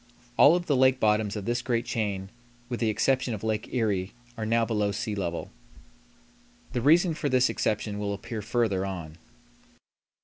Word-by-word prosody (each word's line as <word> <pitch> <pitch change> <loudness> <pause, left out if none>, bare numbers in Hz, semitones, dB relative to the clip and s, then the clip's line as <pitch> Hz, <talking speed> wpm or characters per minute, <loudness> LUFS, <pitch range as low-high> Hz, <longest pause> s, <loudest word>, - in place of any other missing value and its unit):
All 150 +4 +7
of 175 0 -2
the 145 - +1
lake 130 0 +4
bottoms 105 -1 +2
of 105 -2 -5
this 120 +1 0
great 120 -1 -1
chain, 100 -4 -3 0.4
with 120 - -3
the 115 - +1
exception 130 +2 +1
of 105 - -9
Lake 110 -1 -2
Erie, 105 -6 -1 0.2
are 110 -2 -4
now 115 +1 +2
below 105 -3 0
sea 105 +2 -3
level. 85 -4 -4 1.2
The 120 - -1
reason 165 +6 +4
for 150 -2 -2
this 130 0 +3
exception 105 -1 -2
will 100 -1 -2
appear 110 +2 -6
further 110 -3 0
on. 85 -4 -6
110 Hz, 170 wpm, -27 LUFS, 100-125 Hz, 1.2 s, All